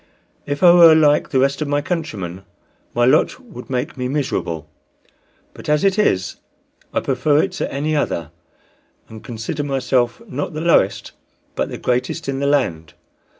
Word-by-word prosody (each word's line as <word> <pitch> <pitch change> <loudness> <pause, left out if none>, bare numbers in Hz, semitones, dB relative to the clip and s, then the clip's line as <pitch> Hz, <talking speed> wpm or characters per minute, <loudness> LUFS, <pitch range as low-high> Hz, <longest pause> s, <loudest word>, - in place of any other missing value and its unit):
If 145 +2 -3
I 175 -1 +8
were 170 -2 +8
like 150 -2 +3
the 135 - 0
rest 140 +2 +1
of 150 - -1
my 145 0 +1
countrymen, 110 - -4 0.5
my 120 0 +3
lot 130 - +3
would 220 - -12
make 130 +2 -3
me 125 -1 -2
miserable; 125 - -3 0.9
but - - -9
as 150 0 +2
it 195 +1 +2
is 95 - +1 0.5
I - - -1
prefer 145 +3 +2
it 195 - -2
to 185 - -4
any 150 +3 -1
other, 85 - -2 0.8
and 110 0 -11
consider 115 +6 -5
myself 130 -4 0
not 145 +5 -4
the 155 - -3
lowest 165 - +2 0.4
but - - -2
the - - -6
greatest 125 +2 -2
in 135 -1 -2
the 140 - 0
land. 85 - -1
140 Hz, 165 wpm, -19 LUFS, 120-150 Hz, 0.9 s, I